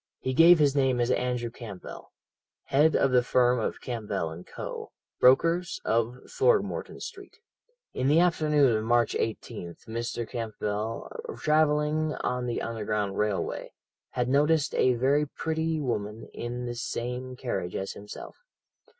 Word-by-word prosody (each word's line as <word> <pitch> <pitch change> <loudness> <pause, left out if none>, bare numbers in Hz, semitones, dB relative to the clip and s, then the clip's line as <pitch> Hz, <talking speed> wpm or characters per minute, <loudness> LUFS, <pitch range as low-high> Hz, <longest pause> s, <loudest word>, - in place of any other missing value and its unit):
"He 130 - -2
gave 170 +5 +8
his 145 -3 +3
name 130 -3 +2
as 120 +1 +2
Andrew 125 -2 -1
Campbell, 110 -6 -9 0.5
head 150 +3 +3
of 135 - +3
the 125 -1 +5
firm 125 0 +3
of 110 - -2
Campbell 100 -8 -4
& - - -31
Co., - - -6 0.3
brokers, 165 +7 +4
of 115 +2 +1
Throgmorton 450 +1 +1
Street. - - -9 0.6
"In 130 - 0
the 150 +4 +5
afternoon 150 -7 +3
of 110 - -1
March 120 +1 +2
18th 105 -6 -4
Mr. 115 0 -3
Campbell, 110 -1 -3 0.3
travelling 150 0 +2
on 125 0 -2
the 120 - -2
Underground 105 -3 -2
Railway, 105 -2 -2 0.4
had 125 -1 -1
noticed 150 +3 +3
a 130 -1 +3
very 140 +5 +2
pretty 160 +2 -2
woman 110 -5 -3
in 120 +1 -4
the 120 - -3
same 125 +2 -4
carriage 100 -9 -3
as 95 - -3
himself. 105 +1 -10
125 Hz, 140 wpm, -28 LUFS, 115-150 Hz, 0.6 s, gave